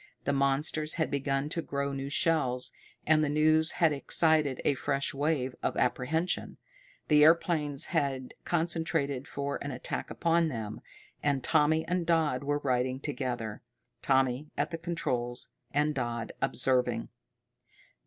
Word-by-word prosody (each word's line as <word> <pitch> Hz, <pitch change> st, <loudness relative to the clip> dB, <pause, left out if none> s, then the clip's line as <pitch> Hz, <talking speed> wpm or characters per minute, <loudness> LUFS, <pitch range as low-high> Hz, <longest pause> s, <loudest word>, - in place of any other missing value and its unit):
The 140 Hz, -, 0 dB
monsters 140 Hz, +3 st, +1 dB
had 160 Hz, -2 st, -1 dB
begun 140 Hz, 0 st, 0 dB
to 165 Hz, +1 st, -2 dB
grow 140 Hz, -2 st, -3 dB
new 135 Hz, 0 st, -4 dB
shells, 140 Hz, -5 st, +1 dB, 0.3 s
and 155 Hz, 0 st, +4 dB
the 150 Hz, -, +1 dB
news 155 Hz, +2 st, +3 dB
had 165 Hz, -3 st, +3 dB
excited 150 Hz, -1 st, +2 dB
a -, -, +4 dB
fresh 140 Hz, +2 st, -1 dB
wave 140 Hz, -3 st, 0 dB
of -, -, -1 dB
apprehension. 160 Hz, +8 st, 0 dB, 0.5 s
The 150 Hz, -1 st, +6 dB
airplanes 155 Hz, -3 st, +3 dB
had 135 Hz, -3 st, -1 dB
concentrated 160 Hz, -5 st, -1 dB
for 140 Hz, -1 st, -3 dB
an 145 Hz, -, -4 dB
attack 125 Hz, -2 st, -4 dB
upon 170 Hz, 0 st, +2 dB
them, 110 Hz, -7 st, -5 dB, 0.4 s
and 140 Hz, -3 st, 0 dB
Tommy 155 Hz, +1 st, +3 dB
and 180 Hz, 0 st, 0 dB
Dodd 160 Hz, -6 st, +1 dB
were 145 Hz, +1 st, -1 dB
riding 130 Hz, -1 st, 0 dB
together, 125 Hz, -7 st, -4 dB, 0.4 s
Tommy 135 Hz, +1 st, +1 dB
at 145 Hz, +3 st, 0 dB
the 165 Hz, -, -4 dB
controls, 125 Hz, -8 st, -2 dB, 0.2 s
and 150 Hz, +2 st, +1 dB
Dodd 120 Hz, -4 st, -3 dB
observing. 125 Hz, -1 st, +1 dB
145 Hz, 135 wpm, -30 LUFS, 130-155 Hz, 0.5 s, The